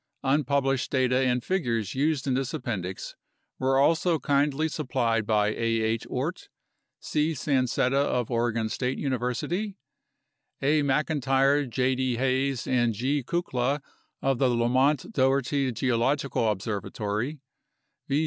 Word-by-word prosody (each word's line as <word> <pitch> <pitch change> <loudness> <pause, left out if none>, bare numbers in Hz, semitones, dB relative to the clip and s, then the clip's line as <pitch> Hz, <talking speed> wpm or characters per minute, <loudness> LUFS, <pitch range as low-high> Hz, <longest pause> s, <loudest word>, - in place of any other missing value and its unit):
Unpublished 135 -1 +1
data 130 -1 +2
and 125 -1 0
figures 115 - -1
used 145 0 0
in 135 - +1
this 135 +3 -1
Appendix 95 - -4 0.4
were 135 0 +2
also 165 +4 +3
kindly 145 +1 +1
supplied 115 -6 -1
by 105 -1 +3
A. 110 - -4 0.2
H. 110 0 -1
Oort; - - -3 0.5
C. 155 +2 0
Sancetta 130 -1 +1
of 125 -4 -1
Oregon 115 -1 0
State 125 +3 -2
University; 140 - -2 0.8
A. 150 +2 +2
Mclntyre, 140 -1 +2
J. 130 +2 +1
D. 130 -1 0
Hays, 130 0 0
and 120 -3 +1
G. 135 +6 0
Kukla 135 -2 -1 0.4
of 135 -2 +1
the 130 - +3
Lamont 125 +4 +1
Doherty 135 0 +1
Geological 125 +1 0
Observatory; 105 +6 -3 0.7
V. 140 - +1
130 Hz, 120 wpm, -27 LUFS, 120-140 Hz, 0.8 s, also